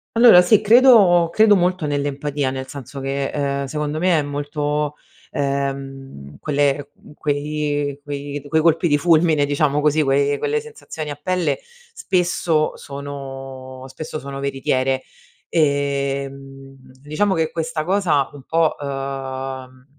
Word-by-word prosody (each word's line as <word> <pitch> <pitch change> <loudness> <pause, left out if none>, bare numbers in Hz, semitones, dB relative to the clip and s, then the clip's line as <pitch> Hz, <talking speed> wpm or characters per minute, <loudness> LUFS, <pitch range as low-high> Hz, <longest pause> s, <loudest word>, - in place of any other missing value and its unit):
Allora 230 -6 +8
sì 200 +4 +4
credo 210 -7 +6
credo 215 0 +5
molto 180 -2 +1
nell'empatia, 145 -1 -2
nel 130 0 -5
senso 135 0 -8
che, 135 +1 -2
ehm, 140 -1 -2
secondo 150 +2 -3
me 175 0 +3
è - - +1
molto, 145 +1 -2 0.3
ehm, 135 - -4
quelle, 145 -1 0
uhm, - - -17
quei 145 -1 -2
quei 145 0 -5
quei 160 +2 +1
colpi 165 +1 +3
di 145 - +4
fulmine 160 -2 +3
diciamo 145 0 +1
così, 150 +1 +2
quei 140 0 +2
quelle 450 +1 0
sensazioni 300 - -8
a - - -5
pelle 180 - -1 0.3
spesso 175 - 0
sono 135 -2 -8
spesso 155 +3 -7
sono 140 -1 -7
veritiere. 135 -1 0 0.5
Ehm, 140 -2 -2 0.3
diciamo 155 +8 0
che 160 -2 0
questa 165 -1 -3
cosa 175 -7 +1
un 140 -2 -12
po', 165 +1 +1
uhm, 135 -2 -5
145 Hz, 130 wpm, -20 LUFS, 135-160 Hz, 0.5 s, Allora